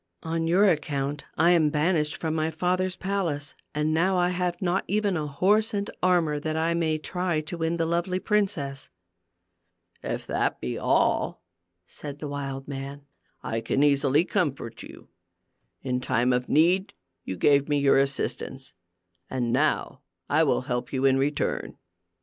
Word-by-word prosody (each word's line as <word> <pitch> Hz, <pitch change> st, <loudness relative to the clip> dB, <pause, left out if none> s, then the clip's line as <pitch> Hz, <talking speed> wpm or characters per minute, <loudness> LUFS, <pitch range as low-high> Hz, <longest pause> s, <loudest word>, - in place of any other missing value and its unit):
On 165 Hz, 0 st, -1 dB
your 190 Hz, +5 st, +5 dB
account 145 Hz, -4 st, -1 dB
I 170 Hz, +3 st, +5 dB
am 165 Hz, -4 st, +4 dB
banished 150 Hz, 0 st, +1 dB
from 160 Hz, -1 st, -2 dB
my 160 Hz, 0 st, 0 dB
father's 180 Hz, +3 st, 0 dB
palace, 175 Hz, -7 st, -2 dB, 0.2 s
and 150 Hz, +1 st, +1 dB
now 185 Hz, +4 st, +2 dB
I 180 Hz, 0 st, +3 dB
have 180 Hz, -1 st, -1 dB
not 185 Hz, +1 st, 0 dB
even 205 Hz, -1 st, +1 dB
a 155 Hz, -2 st, -2 dB
horse 210 Hz, -, +2 dB
and 200 Hz, 0 st, -2 dB
armor 170 Hz, -5 st, +2 dB
that 155 Hz, +1 st, -2 dB
I 165 Hz, +1 st, +1 dB
may 160 Hz, -2 st, +1 dB
try 175 Hz, +1 st, -1 dB
to 155 Hz, +3 st, -7 dB
win 165 Hz, +1 st, 0 dB
the 165 Hz, -, +1 dB
lovely 175 Hz, +2 st, 0 dB
princess." 185 Hz, -11 st, -1 dB, 1.1 s
"If -, -, -4 dB
that -, -, -1 dB
be 60 Hz, -, -3 dB
all," -, -, +1 dB, 0.4 s
said 145 Hz, +8 st, -8 dB
the 150 Hz, -, -6 dB
wild 135 Hz, -1 st, -5 dB
man, 140 Hz, 0 st, -6 dB, 0.4 s
"I 115 Hz, 0 st, -2 dB
can 135 Hz, +5 st, +1 dB
easily 145 Hz, +2 st, +3 dB
comfort 145 Hz, -, -2 dB
you. -, -, -12 dB, 0.7 s
In 125 Hz, -1 st, -1 dB
time 125 Hz, 0 st, +1 dB
of 125 Hz, 0 st, -1 dB
need, 180 Hz, +6 st, +3 dB, 0.3 s
you 95 Hz, -, -5 dB
gave 140 Hz, -, +3 dB
me 145 Hz, -, +2 dB
your 140 Hz, -1 st, +4 dB
assistance, 135 Hz, -1 st, -2 dB, 0.6 s
and 120 Hz, -3 st, -1 dB
now -, -, 0 dB, 0.3 s
I 155 Hz, +2 st, +3 dB
will 145 Hz, -, +2 dB
help 125 Hz, -2 st, -3 dB
you 135 Hz, 0 st, 0 dB
in 135 Hz, -1 st, +5 dB
return." 140 Hz, +2 st, -1 dB
155 Hz, 160 wpm, -26 LUFS, 140-180 Hz, 1.1 s, your